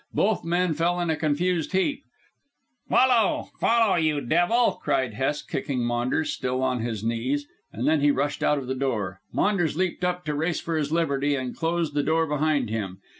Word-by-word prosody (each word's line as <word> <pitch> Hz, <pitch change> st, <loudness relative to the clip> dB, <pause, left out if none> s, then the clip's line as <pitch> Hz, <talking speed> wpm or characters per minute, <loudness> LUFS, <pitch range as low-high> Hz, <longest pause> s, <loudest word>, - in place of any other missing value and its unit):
Both 215 Hz, -1 st, +1 dB
men 175 Hz, 0 st, +1 dB
fell 170 Hz, +3 st, 0 dB
in 175 Hz, -2 st, 0 dB
a -, -, +1 dB
confused 160 Hz, +3 st, 0 dB
heap. 190 Hz, +10 st, 0 dB, 0.9 s
"Follow! 245 Hz, -5 st, +3 dB
Follow, 225 Hz, -5 st, +3 dB
you 155 Hz, -3 st, +1 dB
devil!" 175 Hz, -, +2 dB
cried 130 Hz, -4 st, 0 dB
Hest 135 Hz, +5 st, -2 dB
kicking 125 Hz, -4 st, -2 dB
Maunders, 120 Hz, +6 st, 0 dB
still 130 Hz, +1 st, -2 dB
on 130 Hz, -1 st, 0 dB
his 110 Hz, -2 st, -3 dB
knees, 125 Hz, +6 st, -1 dB, 0.3 s
and 120 Hz, +6 st, -3 dB
then 155 Hz, -1 st, +3 dB
he 145 Hz, -, +4 dB
rushed 145 Hz, +2 st, 0 dB
out 150 Hz, 0 st, +2 dB
of 135 Hz, -, -4 dB
the 130 Hz, -, -2 dB
door. 110 Hz, -8 st, -2 dB
Maunders 175 Hz, -7 st, +1 dB
leaped 185 Hz, -1 st, -1 dB
up 180 Hz, 0 st, -1 dB
to 150 Hz, -, -1 dB
race 160 Hz, +3 st, -1 dB
for 165 Hz, -, -3 dB
his 150 Hz, -2 st, -1 dB
liberty 145 Hz, -3 st, +1 dB
and 130 Hz, -2 st, -4 dB
closed 165 Hz, -2 st, -1 dB
the 145 Hz, -, +1 dB
door 160 Hz, +3 st, +1 dB
behind 150 Hz, -5 st, 0 dB
him. 100 Hz, -4 st, -3 dB
150 Hz, 185 wpm, -25 LUFS, 130-175 Hz, 0.9 s, he